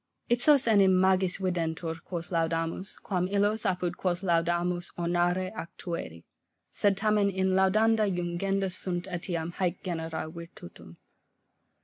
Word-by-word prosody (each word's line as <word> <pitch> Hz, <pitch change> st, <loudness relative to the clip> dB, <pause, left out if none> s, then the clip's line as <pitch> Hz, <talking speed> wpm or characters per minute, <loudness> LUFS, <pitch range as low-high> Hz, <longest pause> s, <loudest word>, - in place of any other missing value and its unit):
Ipsos 255 Hz, +4 st, +5 dB
enim 195 Hz, -5 st, +5 dB
magis 190 Hz, -1 st, +3 dB
videntur, 165 Hz, -3 st, -2 dB
quos 175 Hz, -1 st, -6 dB
laudamus, 165 Hz, +2 st, -2 dB
quam 180 Hz, -2 st, -2 dB
illos, 205 Hz, +2 st, +1 dB
apud 180 Hz, -1 st, -1 dB
quos 180 Hz, 0 st, -1 dB
laudamus 175 Hz, 0 st, 0 dB
ornare 175 Hz, +2 st, 0 dB
ac 170 Hz, -, -6 dB
tueri: 170 Hz, -, -6 dB, 0.5 s
sed 200 Hz, -2 st, +1 dB
tamen 210 Hz, 0 st, +2 dB
in 190 Hz, -1 st, 0 dB
laudenda 215 Hz, +3 st, +3 dB
jungenda 185 Hz, +2 st, -1 dB
sunt 175 Hz, -1 st, -2 dB
eliam 175 Hz, -2 st, -3 dB
haec 180 Hz, -1 st, -2 dB
genera 165 Hz, -3 st, -4 dB
virtutum. 160 Hz, -, -11 dB
180 Hz, 120 wpm, -28 LUFS, 170-195 Hz, 0.5 s, Ipsos